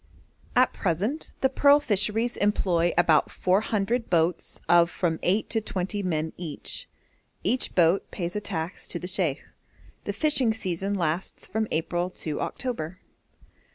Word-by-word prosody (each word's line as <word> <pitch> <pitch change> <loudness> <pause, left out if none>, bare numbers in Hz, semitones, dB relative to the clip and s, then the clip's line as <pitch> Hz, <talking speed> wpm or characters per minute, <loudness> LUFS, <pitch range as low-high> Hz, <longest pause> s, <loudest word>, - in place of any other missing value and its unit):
At 250 +1 +4
present 200 - -2
the 265 - +4
pearl 285 +2 +5
fisheries 225 -1 +2
employ 175 -4 +2
about 165 -3 +4
four 185 +2 +1
hundred 225 +3 -1
boats 170 0 0
of 170 -1 +5
from 165 -2 -1
eight 195 +5 +1
to 225 - +1
twenty 200 0 -3
men 160 -4 -2
each. 160 -5 -5 0.5
Each 255 - 0
boat 175 +2 +3
pays 175 -1 -4
a 210 - -1
tax 165 -2 -5
to - - -2
the 180 - -6
sheikh. 175 -6 -1 0.6
The - - -2
fishing 265 -7 +2
season 195 0 -2
lasts 170 0 -2
from 220 +2 -2
April 175 +2 -1 0.2
to 155 -2 -2
October. 185 -10 -4
185 Hz, 145 wpm, -26 LUFS, 170-220 Hz, 0.6 s, pearl